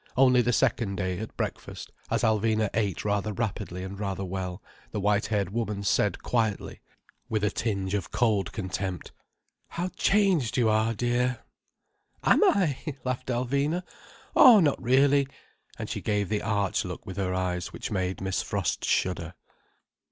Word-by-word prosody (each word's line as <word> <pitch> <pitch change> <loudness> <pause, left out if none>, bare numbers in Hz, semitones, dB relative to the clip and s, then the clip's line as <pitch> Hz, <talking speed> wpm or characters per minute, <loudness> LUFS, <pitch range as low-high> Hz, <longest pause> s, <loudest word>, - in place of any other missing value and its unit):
Only 125 -1 +6
the 120 +1 +1
second 105 -3 +1
day, 90 0 -2
at 110 - -7
breakfast, - - -5 0.2
as 115 0 0
Alvina 110 -1 +2
ate 100 -5 -1
rather 105 +1 0
rapidly 100 -5 -3
and 95 +1 -7
rather 100 -2 -3
well, 90 0 -4 0.3
the 105 - -4
white 105 +1 +1
haired 100 -4 -1
woman 105 -2 -2
said 100 -1 +1
quietly, 110 -4 -1 0.5
with 110 -2 -1
a 105 - +2
tinge 100 -4 -2
of 100 -4 -2
cold 110 -5 +1
contempt: 95 -2 -4 0.6
"How 175 +2 -3
changed 190 - +2
you 120 -3 +3
are, 110 +1 +2
dear!" 125 +2 0 0.8
"Am - - +5
I?" 185 - +3 0.2
laughed 130 -1 -3
Alvina. 140 +7 0 0.5
"Oh, 255 -10 +9
not 150 -6 +2
really." 135 +3 +4 0.5
And - - -5
she - - -4
gave 105 -2 0
the 105 -1 0
arch 100 -2 0
look - - -7
with 95 - -7
her 90 -2 -1
eyes, 90 -1 -2
which - - -6
made 95 -2 -2
Miss 95 -1 -1
Frost - - -2
shudder. 90 -1 0
105 Hz, 155 wpm, -27 LUFS, 95-125 Hz, 0.8 s, Oh